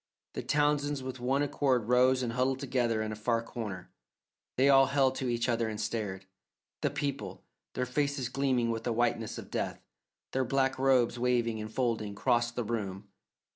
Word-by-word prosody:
The - - -3
Townsends 145 -1 +1
with 130 0 -6
one 135 +3 +1
accord 130 -5 +1
rose 125 +1 +4
and 115 -2 -2
huddled 130 +1 +1
together 120 -5 0
in 110 - -3
a - - -4
far 115 +2 0
corner; 105 -6 -6 0.6
they 130 +2 +4
all 135 -1 +7
held 135 -1 +3
to 130 - -2
each 120 0 0
other 115 -2 +1
and 105 -1 -5
stared. 105 -4 -3 0.6
The 145 - +2
people, 140 -1 -4 0.3
their 125 - 0
faces 140 0 -1
gleaming 130 -3 +1
with 115 0 -3
a 120 - +1
whiteness 115 -1 0
of - - -9
death, - - -3 0.5
their 130 - +1
black 135 +1 +1
robes 125 -3 +3
waving 120 -3 +1
and 110 0 -6
folding, 110 -4 -1
crossed 120 +3 +1
the 120 - -1
room. 100 -3 -4
125 Hz, 175 wpm, -30 LUFS, 115-135 Hz, 0.6 s, all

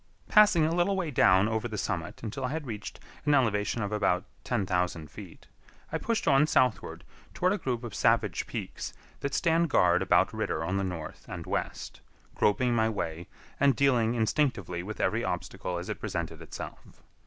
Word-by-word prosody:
Passing 210 -7 +6
a 160 - +1
little 175 +3 +2
way 175 -5 -2
down 95 -5 +5
over 110 +1 -1
the 110 -2 -5
summit 85 -1 -3
until 110 +2 -4
I - - -1
had 160 -2 -3
reached 110 -4 -6 0.2
an 150 - +3
elevation 110 -3 +1
of 100 - -3
about 100 -3 +1 0.2
10,000 90 -8 -1
feet, - - -11 0.5
I - - -1
pushed 230 -1 -1
on 140 +2 +5
southward 125 -6 +1 0.3
toward 180 +2 +2
a 205 - -2
group 125 -2 -2
of 120 -4 -6
savage - - +1
peaks - - -6 0.2
that 140 0 -2
stand 170 -1 +2
guard 90 -9 +4
about - - +3
Ritter 80 - -2
on 90 +4 -1
the 95 - 0
north 90 -4 -6
and - - -6
west, - - -4 0.3
groping 120 +4 +2
my 110 -1 +2
way, 85 -5 -4 0.3
and 140 -2 +4
dealing 120 -3 +3
instinctively 110 - 0
with 105 +4 -7
every - - +1
obstacle 90 -1 -3
as 85 - -5
it - - -4
presented - - -4
itself. - - -9
115 Hz, 175 wpm, -29 LUFS, 95-140 Hz, 0.5 s, Passing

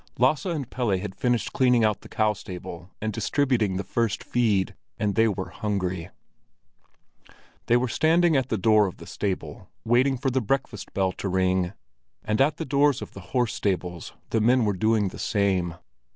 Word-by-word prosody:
Lasse 135 +7 +2
and 155 -8 -2
Pelle 120 -7 0
had 95 +1 -5
finished 120 +2 0
cleaning 125 -3 +4
out 105 -2 0
the - - -13
cow 110 -1 +1
stable 90 -2 -8
and 110 0 -2
distributing 115 -3 +1
the 100 - -2
first 115 -3 -1
feed, 105 -6 +1 0.2
and 105 -1 0
they 115 +2 +4
were 95 -3 -3
hungry. 95 -5 -2 1.6
They 120 - +5
were 125 +1 0
standing 165 +5 +3
at 130 -2 +1
the 110 - 0
door 105 +1 +4
of 90 - -7
the - - -11
stable, 95 -3 -4 0.2
waiting 125 +3 +3
for 135 +1 -1
the 130 +1 +1
breakfast 120 -3 -2
bell 95 -1 +2
to 100 - -4
ring; 95 0 +1 0.5
and 105 +4 0
at 145 +2 +3
the - - -4
doors 140 0 +2
of - - -9
the - - -9 0.2
horse 120 -4 +2
stables, 90 -3 -2 0.2
the 110 - +2
men 120 +1 +4
were 105 - +1
doing 105 +1 +2
the - - -11
same. 95 -5 0
110 Hz, 180 wpm, -25 LUFS, 95-125 Hz, 1.6 s, They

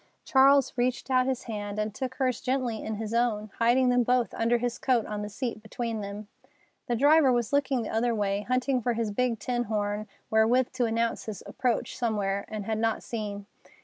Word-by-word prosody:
Charles 275 +1 +5
reached 250 +1 -1
out 255 0 +3
his 260 -2 -1
hand 205 -2 -5
and 215 0 -2
took 255 +3 -4
hers 255 -2 0
gently 250 -4 -1
in 220 - -3
his 220 +1 -5
own, 220 -3 0
hiding 245 +2 +4
them 245 0 +4
both 245 -3 +1
under 230 +1 +2
his 240 0 -3
coat 245 -4 +2
on 210 -1 -4
the 210 - -4
seat 230 +1 -4
between 225 0 -4
them. 205 +1 -7 0.6
The 240 - +1
driver 285 +2 +5
was 240 0 0
looking 270 -3 +1
the - - -5
other 230 +1 +1
way, 200 -1 0
hunting 255 +3 0
for 240 +1 0
his 225 -2 -1
big 240 +2 0
tin 240 +3 -2
horn, 210 0 -2 0.2
wherewith 230 +3 +3
to 255 -2 0
announce 230 0 -1
his 210 -4 -6
approach 245 -3 -1
somewhere, 205 -5 -1
and 215 -2 -5
had 220 0 -1
not 225 0 0
seen. 205 -3 -5
230 Hz, 200 wpm, -28 LUFS, 215-250 Hz, 0.6 s, Charles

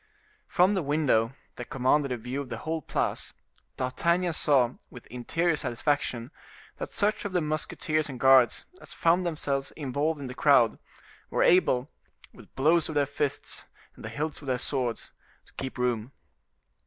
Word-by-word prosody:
From 185 +3 +3
the 190 - +1
window, 140 -6 +1 0.2
that 125 - -7
commanded 135 +2 +2
a 125 - -1
view 125 +5 -4
of 140 - -8
the - - -4
whole 160 0 -3
Place, - - -2 0.4
D'Artagnan 170 +7 +1
saw, 135 -6 +3 0.2
with 125 - -12
interior 160 +8 0
satisfaction, 130 -2 -1 0.5
that - - -5
such 210 +1 0
of 205 - -4
the 180 - +3
musketeers 155 0 -1
and 130 -3 -7
guards 130 -2 +5 0.2
as - - -9
found 175 +2 +2
themselves 140 -4 -2
involved 145 +2 -2
in 140 - -6
the 125 - -6
crowd, 125 -5 +4 0.5
were - - +1
able, 135 -8 +4 0.5
with - - -17
blows 160 +5 +3
of 155 - -5
their 145 -1 +3
fists 140 0 -3 0.3
and - - -13
the 110 - -5
hilts 150 +8 -4
of 140 - -11
theirs 125 -1 +1
swords, 125 -4 -1 0.3
to - - -24
keep 130 -1 -6
room. 125 -1 -1
140 Hz, 165 wpm, -28 LUFS, 125-160 Hz, 0.5 s, guards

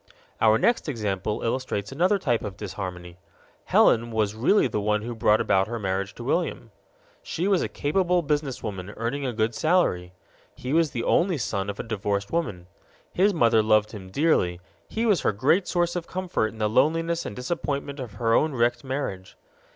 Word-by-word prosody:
Our 110 0 +5
next 235 - +1
example 105 -5 -2
illustrates 115 -4 -2
another 180 +9 +2
type 120 - 0
of 100 -3 -6
disharmony. 90 -3 -7 0.5
Helen 115 +1 +4
was 110 -3 0
really 130 - +3
the 105 -4 -1
one 105 +1 0
who 120 +1 -4
brought 110 -1 +3
about 95 +1 +2
her 115 +1 -4
marriage 95 -1 -2
to - - -8
William. - - -2 0.5
She 175 +4 -2
was 195 -3 +3
a - - -2
capable 175 +4 +1
businesswoman, 125 - -3
earning 130 +5 -2
a - - -1
good 110 0 0
salary. 110 - +1 0.4
He 130 +3 -4
was 165 -1 +3
the 120 -3 -4
only 175 -1 +2
son 100 -5 -2
of 100 - -5
a - - -2
divorced 100 -3 -2
woman. 105 - -2 0.5
His 195 +3 +3
mother 115 - +4
loved 110 -1 +3
him 95 -4 -9
dearly; 95 - +1 0.3
he 225 +1 -2
was 205 -9 +3
her - - +2
great 140 - +2
source 175 -1 0
of 175 -2 -4
comfort 185 -10 -1
in 110 - -10
the 110 -1 +1
loneliness 165 +8 +1
and 100 - -6
disappointment 140 +1 -3
of 120 -5 -6
her 115 +2 0
own 155 +5 +3
wrecked 120 +1 +1
marriage. 130 -9 -5
115 Hz, 180 wpm, -25 LUFS, 105-155 Hz, 0.5 s, Our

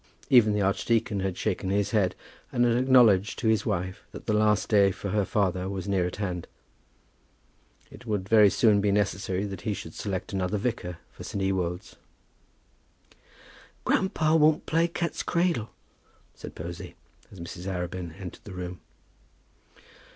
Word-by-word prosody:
Even 115 -5 +6
the 105 -1 +1
archdeacon 100 +2 +1
had 95 -1 -2
shaken 95 -2 -2
his 100 +1 0
head, 100 -5 +2 0.4
and 120 - +2
had 120 -1 +3
acknowledged 120 -6 +4
to 115 - -1
his 110 -2 +1
wife 90 +2 -2
that - - -9
the - - 0
last 105 0 +2
day 100 -2 +5
for 100 +1 -5
her 105 0 +1
father 95 -2 0
was 95 -2 -5
near 95 -3 +1
at 90 - -6
hand. 90 -4 -4 1.4
It 120 - -13
would 100 -3 -2
very 105 -1 +6
soon 105 -1 +3
be 100 0 +2
necessary 100 -1 0
that 100 -1 -6
he 105 -3 -2
should 80 -3 -8
select 100 -1 -4
another 95 +2 -1
vicar 100 -6 -3
for - - -11
St. 100 -2 -4
Ewolds. 95 -1 -2 1.9
"Grandpa 160 -5 +2
won't 155 -1 +4
play 165 +1 +2
cat's 170 0 -3
cradle," 170 -10 0 0.6
said - - -10
Posy, 85 +1 -7 0.4
as 95 - -12
Mrs. 85 +2 -7
Arabin 90 -2 -4
entered 95 -2 -9
the 100 - -9
room. 90 0 -6
100 Hz, 155 wpm, -27 LUFS, 95-110 Hz, 1.9 s, Even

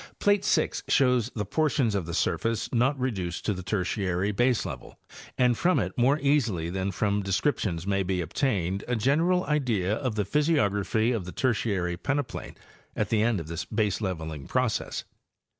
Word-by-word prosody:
Plate 205 -1 +3
6 - - +1
shows 125 -4 +3
the 105 -2 -2
portions 135 -1 +1
of 95 -5 -2
the 85 - -3
surface 110 +8 -1
not 135 +4 +2
reduced 95 -9 -3
to 105 - +1
the 95 - -6
Tertiary 95 0 -1
baselevel, 120 +3 -1 0.4
and 125 -1 +4
from 180 +9 +2
it - - -1
more 135 +3 +3
easily 115 - +1
than 95 +1 -1
from 100 +2 0
descrip 100 +9 0
tions 85 -4 -2
may 100 0 +1
be 95 -1 -1
obtained 95 - -1
a 125 - 0
general 165 +10 +2
idea 115 -11 0
of 120 0 -2
the 105 -2 0
physiography 110 - +1
of 110 -7 -2
the 90 - -6
Tertiary 100 -8 0
peneplain 140 +6 -3 0.4
at - - -1
the 110 -2 +2
end 115 -3 +2
of 80 - -7
this 85 +2 -4
baseleveling 95 -9 -2
process. 125 -3 -1
105 Hz, 165 wpm, -27 LUFS, 95-130 Hz, 0.4 s, and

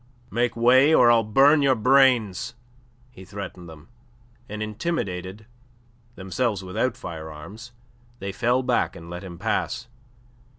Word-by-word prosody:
"Make 120 +1 0
way, 130 +6 +5
or 120 -1 +6
I'll 115 -1 +4
burn 135 +8 +4
your 135 -2 +3
brains!" 120 -4 +2 0.6
he 95 - -13
threatened 95 -3 -8
them, 80 0 -14 0.6
and 105 +1 -4
intimidated, 105 - -4 0.7
themselves 100 +2 -2
without 105 +7 -2
firearms, 80 +8 -9 0.5
they 100 -3 -5
fell 125 +5 0
back - - 0
and 85 0 -11
let 90 +2 -7
him 90 -3 -9
pass. 115 +4 -2
110 Hz, 125 wpm, -24 LUFS, 95-125 Hz, 0.7 s, or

